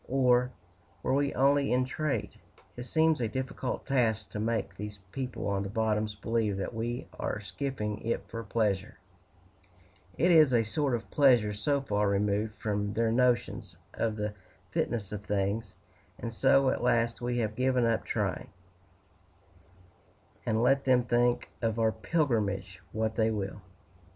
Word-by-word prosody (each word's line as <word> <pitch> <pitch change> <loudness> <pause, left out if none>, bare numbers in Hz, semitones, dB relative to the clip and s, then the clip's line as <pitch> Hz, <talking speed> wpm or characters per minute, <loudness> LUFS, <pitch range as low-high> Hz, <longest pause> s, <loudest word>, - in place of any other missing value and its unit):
or, 125 -1 +3 0.5
were - - +1
we 140 +1 +2
only 140 +1 +3
in 125 +1 +3
trade?" 150 +3 -2 0.4
It 120 - -6
seems 160 0 +2
a 115 - +1
difficult 130 +2 -4
task 110 -6 +1
to 105 - -4
make 115 +1 -1
these 105 0 -6
people 130 -1 -4
on 100 -1 0
the 100 - -4
bottoms 105 0 0
believe 110 -1 -1
that 95 - -3
we 120 +2 -3
are - - -2
skiffing 105 0 -4
it 115 - -2
for 115 0 -6
pleasure 105 -3 -1 1.2
it 175 +2 +4
is 155 -6 +6
a 115 - +4
sort 135 +3 0
of 115 - -7
pleasure 120 -7 +4
so 140 +7 0
far 105 -5 0
removed 105 +2 0
from 105 -1 -2
their 115 0 +1
notions 120 -6 +1 0.2
of 115 -2 -1
the 105 -1 -3 0.4
fitness 100 -1 -1
of 105 -1 -5
things; 105 +1 -1 0.4
and 115 -1 -5
so 130 +6 +4
at - - -2
last 115 -1 +1
we 120 0 -1
have 110 -3 0
given 130 0 +2
up 115 -1 +1
trying, - - -2 2.0
and 110 +1 +2
let 135 +2 +3
them 125 -2 +4
think 120 0 +1
of 115 -1 0
our 110 -1 +3
pilgrimage 105 - -1
what 110 0 -1
they 110 -1 +2
will. 100 -2 -3
115 Hz, 155 wpm, -30 LUFS, 105-125 Hz, 2.0 s, is